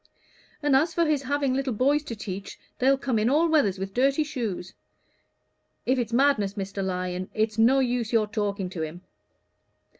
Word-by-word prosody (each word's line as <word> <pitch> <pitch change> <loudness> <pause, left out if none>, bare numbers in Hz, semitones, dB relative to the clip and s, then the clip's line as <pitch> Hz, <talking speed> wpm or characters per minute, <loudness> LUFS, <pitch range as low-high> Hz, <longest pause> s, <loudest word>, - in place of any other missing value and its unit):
And 290 -2 +3
as 320 +4 +2
for 340 - +3
him 305 -2 +2
having 280 0 0
little 265 -1 -1
boys 280 +6 +2
to 235 - -5
teach, 195 -2 -7 0.2
they'll 270 +2 +4
come 260 -4 -1
in 215 +3 +2
all 310 +5 +3
weathers 285 - +2
with 195 +1 -5
dirty 275 +5 +2
shoes. 225 -10 -4 1.1
If 255 +1 +2
it's 235 -1 -2
madness, 235 -6 +2
Mr. 195 -1 -4
Lyon, 180 0 -3
it's 215 0 0
no 245 +4 +5
use 245 -4 0
your 225 -2 +3
talking 205 -3 -2
to 175 - -5
him." 160 +3 -5
235 Hz, 175 wpm, -26 LUFS, 200-275 Hz, 1.1 s, no